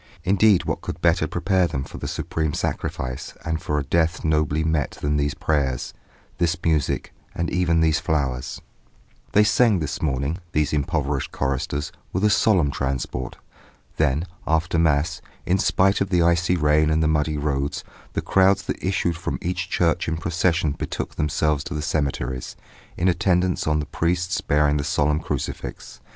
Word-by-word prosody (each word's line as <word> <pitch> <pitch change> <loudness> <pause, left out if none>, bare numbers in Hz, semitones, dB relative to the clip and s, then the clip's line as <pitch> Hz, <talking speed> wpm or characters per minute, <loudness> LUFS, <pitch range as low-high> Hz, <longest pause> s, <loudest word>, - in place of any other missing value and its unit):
Indeed 100 0 +4
what - - -2
could - - -6
better - - +2
prepare 95 -2 +1
them 65 -4 -3
for - - -9
the - - -4
supreme 80 -2 -2
sacrifice 65 0 -3
and 80 0 -2
for 75 - -1
a 75 - 0
death 85 +4 +1
nobly 75 -1 +1
met 80 -3 -1
than 75 0 0
these 70 -1 0
prayers, 70 -5 -1 0.5
this 85 +1 +1
music 80 -4 0 0.2
and 85 0 -2
even 85 -2 +2
these 80 0 +3
flowers? 65 -5 -2 0.7
They 105 - +6
sang 110 0 +4
this 75 -4 -3
morning, 70 +3 -1
these 75 -1 +1
improvised 70 -1 -1
choristers, 70 +1 -2 0.2
with 95 - -1
a 105 - +4
solemn 95 -8 +3
transport. 65 -2 -3 0.6
Then 75 +1 +1 0.2
after 80 +1 +1
Mass, 80 +2 +1 0.2
in 95 +2 +2
spite 95 +2 +3
of 100 - 0
the 90 -2 +3
icy 85 +1 +3
rain 75 -1 +3
and 80 +1 +2
the - - +3
muddy 75 0 +1
roads, 70 -1 -1 0.3
the - - -2
crowds 95 0 +3
that - - -4
issued 90 -2 0
from 85 - -3
each 90 0 -3
church 85 -3 +1
in 80 0 -1
procession 85 -1 +1
betook - - -4
themselves 75 -1 0
to 85 - -5
the 75 - -2
cemeteries, 65 -5 -2 0.4
in 90 - +1
attendance 90 0 +1
on 75 0 +2
the 75 - -2
priests 85 +4 -1
bearing 75 0 +2
the 70 - -1
solemn 75 +1 +1
crucifix. - - -5
80 Hz, 165 wpm, -23 LUFS, 75-85 Hz, 0.7 s, They